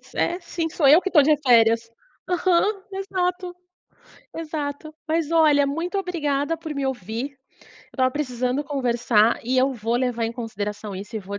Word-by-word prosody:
É, 350 +2 0
sim 335 -1 -3
sou 310 -3 +1
eu 310 +6 +7
que 385 - -2
tô 300 - +7
de 300 +2 +4
férias. 230 -3 +4 0.4
Aham, 370 +3 +1
exato, 365 -2 -2 0.8
exato. 310 -1 -5
Mas 320 0 0
olha, 300 -3 +4
muito 335 +7 -3
obrigada 325 -4 -1
por 315 -2 -7
me 280 -1 -2
ouvir, 240 +2 -4 0.4
eu - - -23
estava 255 -1 +2
precisando 255 -1 -2
conversar 240 -5 +1
e 255 +3 -1
eu 265 +2 +3
vou 230 0 -1
levar 245 -2 -1
em 225 - -2
consideração 210 -3 -5
isso 205 +4 -7
e - - -1
vou 200 +1 -7
280 Hz, 165 wpm, -23 LUFS, 235-330 Hz, 0.8 s, eu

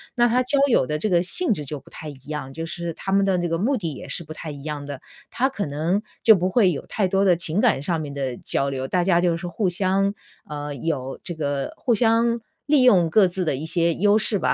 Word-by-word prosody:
那 240 0 +4
他 250 +2 +2
交 280 +3 +1
友 230 - +3
的 150 - -1
这 215 - -1
个 175 -1 +3
性 340 - +3
质 150 -5 -5
就 145 +1 -5
不 - - -19
太 155 - -9
一 - - -8
样， 145 -3 -5
就 165 0 -5
是 170 0 -5
他 195 - -6
们 195 0 +3
的 190 -2 +2
那 175 - -1
个 165 - 0
目 245 +10 +1
的 165 -7 -4
也 - - -9
是 170 - -2
不 155 - -13
太 155 - -8
一 140 -1 -10
样 150 -2 -5
的。 140 -2 -7 0.3
他 265 +3 +1
可 205 -8 -3
能 160 +8 -1 0.2
就 220 -2 +8
不 185 +1 0
会 190 -2 +3
有 140 - -5
太 195 -4 0
多 195 +1 +1
的 180 -3 +5
情 170 +3 -2
感 220 - +3
上 165 +2 -1
面 145 -2 -6
的 135 -3 -3
交 140 - -1
流， 130 -1 -4
大 180 +3 +1
家 175 -2 +3
就 175 -2 +2
是 175 +1 -6
互 185 +3 -1
相， 195 +2 +1 0.4
嗯， 145 -2 -6
有 135 -5 -3
这 175 - -5
个 145 -3 -3
互 235 -3 +1
相 230 +1 +2 0.3
利 285 -3 +4
用 180 -9 +5
各 195 +1 +5
自 180 +1 -3
的 155 - 0
一 155 - -5
些 170 0 +2
优 205 +2 +3
势 215 -1 +3
吧， - - +1
175 Hz, 285 characters per minute, -23 LUFS, 150-200 Hz, 0.4 s, 就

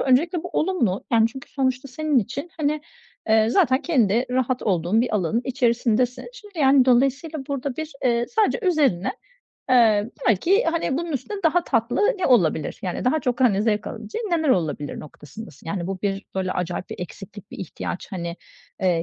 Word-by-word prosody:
öncelikle 315 +6 +2
bu 360 - -5
olumlu, 305 - 0
yani 225 -1 +5
çünkü 265 +3 -11
sonuçta 260 0 -1
senin 295 +1 +1
için, 275 - -4
hani, 300 -1 0 0.5
eee, 220 0 +4
zaten 260 +2 +3
kendi 240 - +2
rahat 255 0 0
olduğun 185 +2 +1
bir 235 -2 -1
alanın 205 +4 +1
içerisindesin. 245 -1 +1
Şimdi, 415 -8 -13
yani, 270 -2 +5
dolayısıyla 275 +4 +1
burada 275 -2 -3
bir, 315 0 -5
eee, 235 -1 +2
sadece 445 +2 +1
üzerine, 280 - +2 0.6
eee, 225 -3 +4 0.2
belki, 365 - +3
hani, 330 -5 0
bunun 340 -1 -4
üstüne 390 - -4
daha 335 +2 +3
tatlı 230 +2 0 0.2
ne 370 - +1
olabilir, 170 - +2
yani 180 -2 -3
daha 285 +5 +2
çok, 250 0 -2
hani, 210 -5 +3
zevk 210 -2 0
alabileceğin 230 - -5
neler 320 -3 +1
olabilir 160 - 0
noktasındasın. 150 +4 -12
Yani 170 +1 -3
bu 195 -1 -4
bir 195 -1 -2
böyle 185 -1 -1
acayip 180 0 -4
bir - - -6
eksiklik, 195 +2 -9
bir - - -9
ihtiyaç, 180 0 -5
hani, 170 -1 -4 0.4
eee, 175 -3 +2
245 Hz, 170 wpm, -23 LUFS, 200-290 Hz, 0.6 s, yani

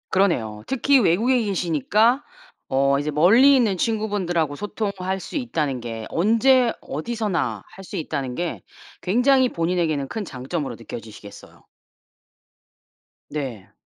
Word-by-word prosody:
그러네요. 120 - +1
특히 270 +1 +3
외국에 235 +6 +3
계시니까 205 - +2 0.5
어 140 +1 +2
이제 150 +1 -2
멀리 225 - +6
있는 220 -7 +2
친구분들하고 190 -8 -1
소통할 195 -2 -3
수 - - -9
있다는 155 - -2
게 115 -2 -6
언제 230 +6 +3
어디서나 210 +4 -3
할 195 - -11
수 200 - -8
있다는 140 -7 -3
게 175 +2 -3 0.4
굉장히 250 +6 +3
본인에게는 165 - -1
큰 220 - -4
장점으로 135 -1 -4
느껴지시겠어요. 110 -2 -11 1.7
네. 130 -10 -6
180 Hz, 290 characters per minute, -23 LUFS, 140-225 Hz, 1.7 s, 멀리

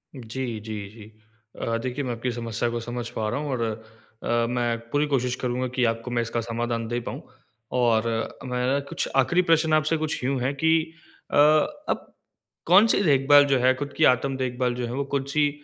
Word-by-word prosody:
जी, 120 -1 -5
जी, 110 +1 -7 0.2
जी। 110 0 -14 0.5
अ, 115 0 0
देखिए 130 +2 -3
मैं 125 - -2
आपकी 120 +2 -3
समस्या 115 0 -2
को 120 0 -3
समझ 120 +1 -5
पा 110 -3 -3
रहा 120 - -2
हूँ 150 0 -4
और 125 -3 -2 0.6
अ, 120 0 +1
मैं 120 -1 0
पूरी 145 +4 +1
कोशिश 125 -3 0
करूँगा 125 0 -1
कि 130 - +1
आपको 115 +1 -2
मैं 120 -1 +1
इसका 115 0 -2
समाधान 115 0 -3
दे 120 +1 -2
पाऊँ। 120 - -6 0.6
और 115 -2 +3 0.4
मेरा 125 +2 0
कुछ - - -2
आख़िरी 135 +7 +3
प्रश्न 160 -1 +3
आपसे 155 +1 +2
कुछ 155 -4 -3
यूँ 135 +1 0
है 130 +3 0
कि 160 +3 +1 0.6
अ, - - -1
अब 155 - +2 0.5
कौन-सी 200 +4 +5
देखभाल 145 -2 +6
जो 140 -1 +2
है 130 +1 +4
खुद 140 +1 -5
की 155 - +2
आत्म 130 +2 -3
देखभाल 125 -1 -1
जो 125 0 -3
है, 120 - -5
वो 140 - -1
कौन-सी 140 +2 +1
125 Hz, 190 wpm, -25 LUFS, 120-140 Hz, 0.6 s, देखभाल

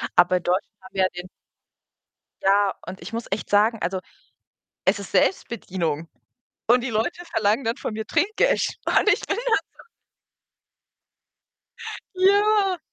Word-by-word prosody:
Aber 180 +1 +5
in 175 - -6
Deutschland 185 +4 -1
haben 190 +1 -14
wir 190 - +3
ja 185 - +3
den 180 +1 -8 1.1
ja, 200 0 +3
und 190 +1 -8
ich - - -9
muss 230 +1 -3
echt 200 - -3
sagen, 215 +2 +3
also, 190 +1 -1 0.9
es - - +3
ist - - -9
Selbstbedienung 170 - 0 0.6
und 245 +2 +4
die 245 - -3
Leute 225 +11 -1
verlangen 220 0 +1
dann 230 +3 0
von 235 - -4
mir 220 0 -4
Trinkgeld. 440 +7 +1
Und - - +3
ich - - 0
bin 400 - -2
da 480 +1 +1 0.2
so - - -13 2.3
Ja. 395 -1 +3
220 Hz, 145 wpm, -24 LUFS, -, 2.3 s, Aber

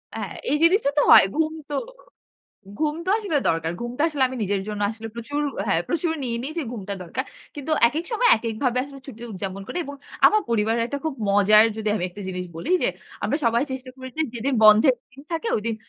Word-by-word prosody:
হ্যাঁ, - - -5 0.2
এই 295 - +3
জিনিসটা 350 -2 +4
তো - - +6
হয়। - - +10
ঘুম 315 0 +1 0.2
তো 290 - -2 1.0
ঘুম 305 -1 +1
তো - - +1
আসলে 395 -9 -1
দরকার। 165 0 0
ঘুমটা 240 +4 -3
আসলে 290 -4 -1
আমি 260 - -6
নিজের 195 -1 0
জন্য 210 -1 -4
আসলে 225 0 -7
প্রচুর 285 +6 -4 0.3
হ্যাঁ, 170 -4 +2
প্রচুর 335 0 0
নিয়ে 235 -2 -2
নি 270 - -4
যে - - 0
ঘুমটা 200 -3 -5
দরকার। 255 +10 -4 0.3
কিন্তু 290 +2 -6 0.2
একেক 320 +7 -3
সময় 485 +2 +3
একেক 225 0 -4
ভাবে 250 0 +2
আসলে 280 -1 -11
ছুটি 235 -3 -10
উদযাপন 195 +1 -5
করি 355 - -4
এবং 285 0 -8 0.3
আমার 430 0 +4
পরিবারের 225 +1 +1
একটা 285 +3 -4
খুব 315 -4 -1
মজার 205 +2 +6
যদি 215 -1 -2
আমি 180 - -1
একটা 205 +3 -11
জিনিস 180 -1 -4
বলি 230 - -5
যে, - - +3 0.4
আমরা - - +1
সবাই 235 +2 +3
চেষ্টা 260 0 -6
করেছি 260 +4 -7
যেদিন 255 +4 -1
বন্ধের 215 +5 +7 0.2
দিন 275 - -13
থাকে 330 +8 -2
ঐদিন 225 +1 -2
245 Hz, 210 wpm, -24 LUFS, 210-290 Hz, 1.0 s, হয়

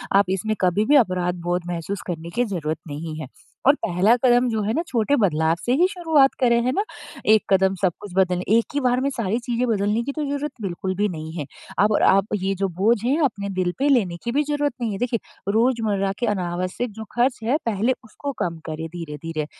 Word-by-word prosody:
आप 200 +1 +6
इसमें 205 +3 -1
कभी 185 +3 +2
भी 290 - +4
अपराध 185 -8 +2
बोध 175 +1 0
महसूस 175 +3 -4
करने 170 -1 -5
की 245 - +2
ज़रूरत 160 -7 -3
नहीं 155 +1 -6
है। 155 - -6 0.4
और 280 - +7
पहला 195 +1 +2
कदम 245 0 +5
जो 220 -2 -1
है 215 +2 0
ना 330 - +1
छोटे 245 +2 +1
बदलाव 160 -3 +2
से 245 - +2
ही 360 - +5
शुरुआत 320 -8 +3
करें, 235 -2 +3
है 255 - +2
ना। 395 +10 0 0.5
एक 220 - +6
कदम 190 0 +4
सब 180 -3 +2
कुछ 205 - -9
बदल 180 -2 +2
एक 225 +3 +4
ही 285 - +1
बार 250 0 +2
में 275 - +1
सारी 230 -4 -1
चीज़ें 245 0 -1
बदलने 210 0 +1
की 280 - -3
तो 305 +1 -3
ज़रूरत 285 +1 -2
बिल्कुल 185 -1 -3
भी 205 +2 +1
नहीं 160 -2 -6
है। 150 - -3 0.3
अब 210 +1 +4
आप 195 +1 +4
ये 195 0 -1
जो 195 - +3
बोझ 215 +5 +4
है 265 +6 +2
अपने 200 -6 -2
दिल 180 -1 +1
पे 285 - +2
लेने 195 -11 +2
की 235 - -2
भी 295 +3 +2
ज़रूरत 290 -1 -1
नहीं 225 -2 -1
है। 195 - -3
देखिए 240 +1 -1 0.4
रोज़मर्रा 220 -5 +1
के 240 - 0
अनावश्यक 185 +3 -2
जो 220 +2 -8
ख़र्च 245 +2 +2
हैं 250 +6 +2
पहले 230 +3 +1
उसको 280 +5 -6
कम 170 -1 -1
करें 160 +1 -4
धीरे-धीरे। 165 -2 -5
210 Hz, 220 wpm, -23 LUFS, 180-245 Hz, 0.5 s, और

